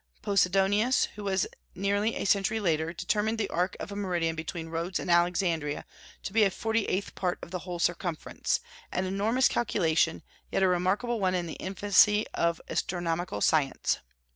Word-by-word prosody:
Posidonius, 200 Hz, +5 st, +3 dB
who 210 Hz, -, -8 dB
was 190 Hz, -2 st, +1 dB, 0.3 s
nearly 200 Hz, +3 st, 0 dB
a -, -, -3 dB
century 200 Hz, +2 st, +2 dB
later, 165 Hz, -4 st, 0 dB
determined 210 Hz, +5 st, -1 dB
the 215 Hz, -3 st, 0 dB
arc 180 Hz, +2 st, -1 dB
of -, -, -6 dB
a -, -, -5 dB
meridian 175 Hz, -5 st, -1 dB
between 165 Hz, +1 st, -5 dB
Rhodes 170 Hz, +3 st, -2 dB
and 180 Hz, -, -2 dB
Alexandria 170 Hz, -3 st, +1 dB, 0.4 s
to 190 Hz, -, -5 dB
be 220 Hz, -1 st, +5 dB
a 200 Hz, -, +5 dB
forty 225 Hz, +3 st, -1 dB
eighth 195 Hz, +2 st, -2 dB
part 180 Hz, -2 st, -1 dB
of 170 Hz, -, -9 dB
the 180 Hz, -, -3 dB
whole 175 Hz, 0 st, -6 dB
circumference, 175 Hz, -, -1 dB, 0.3 s
an 185 Hz, -, -1 dB
enormous 215 Hz, +7 st, +2 dB
calculation, 165 Hz, -8 st, +1 dB, 0.3 s
yet 195 Hz, -, +1 dB
a -, -, +5 dB
remarkable 190 Hz, +7 st, +1 dB
one 185 Hz, -2 st, +1 dB
in 175 Hz, -1 st, -1 dB
the 165 Hz, -, -6 dB
infancy 205 Hz, +2 st, +3 dB
of 170 Hz, 0 st, +1 dB
astronomical 175 Hz, -, -2 dB
science. 145 Hz, 0 st, +2 dB
185 Hz, 165 wpm, -28 LUFS, 170-205 Hz, 0.4 s, be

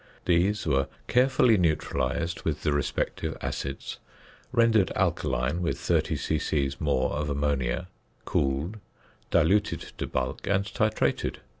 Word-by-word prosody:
These 90 Hz, +4 st, +2 dB
were 70 Hz, -3 st, +2 dB, 0.2 s
carefully 125 Hz, -2 st, +4 dB
neutralised 80 Hz, -1 st, 0 dB
with -, -, -2 dB
the -, -, +2 dB
respective 75 Hz, -1 st, -2 dB
acids, 70 Hz, 0 st, -4 dB, 0.5 s
rendered 115 Hz, -5 st, +4 dB
alkaline 65 Hz, +8 st, 0 dB
with 85 Hz, -, -1 dB
30 -, -, +1 dB
c.c. 70 Hz, -3 st, 0 dB
more 70 Hz, -4 st, +1 dB
of 75 Hz, 0 st, -2 dB
ammonia, 70 Hz, +1 st, 0 dB, 0.4 s
cooled, 70 Hz, +10 st, 0 dB, 0.5 s
diluted 95 Hz, +6 st, +2 dB, 0.2 s
to -, -, -2 dB
bulk, 65 Hz, 0 st, -3 dB
and 100 Hz, 0 st, +2 dB
titrated. 110 Hz, +2 st, 0 dB
80 Hz, 115 wpm, -27 LUFS, 70-100 Hz, 0.5 s, carefully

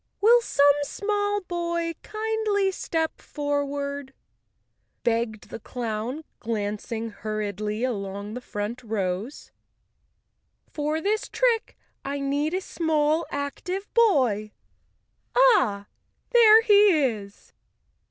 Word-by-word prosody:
"Will 470 Hz, +4 st, +6 dB
some 285 Hz, -9 st, +4 dB
small 410 Hz, +5 st, -1 dB
boy 340 Hz, -2 st, -2 dB
kindly 430 Hz, -2 st, 0 dB
step 325 Hz, -3 st, -2 dB
forward," 285 Hz, -1 st, -3 dB, 0.9 s
begged 230 Hz, -2 st, -1 dB
the -, -, -6 dB
clown, 235 Hz, +5 st, -4 dB, 0.2 s
glancing 220 Hz, +1 st, -3 dB
hurriedly 210 Hz, +1 st, -3 dB
along 200 Hz, -3 st, -3 dB
the 250 Hz, -, -6 dB
front 210 Hz, +1 st, -5 dB
rows. 210 Hz, +2 st, -3 dB, 1.2 s
"For 305 Hz, +1 st, -2 dB
this 425 Hz, +4 st, -1 dB
trick 480 Hz, -3 st, +1 dB, 0.3 s
I 280 Hz, +1 st, -3 dB
need 285 Hz, +4 st, 0 dB
a 375 Hz, -, -1 dB
small, 315 Hz, -2 st, 0 dB
active 360 Hz, +8 st, -4 dB
boy. 255 Hz, -, +3 dB, 0.8 s
Ah, 260 Hz, -, +4 dB, 0.5 s
there 450 Hz, -2 st, +7 dB
he 410 Hz, -5 st, +6 dB
is!" 210 Hz, -6 st, -4 dB
285 Hz, 95 wpm, -25 LUFS, -, 1.2 s, there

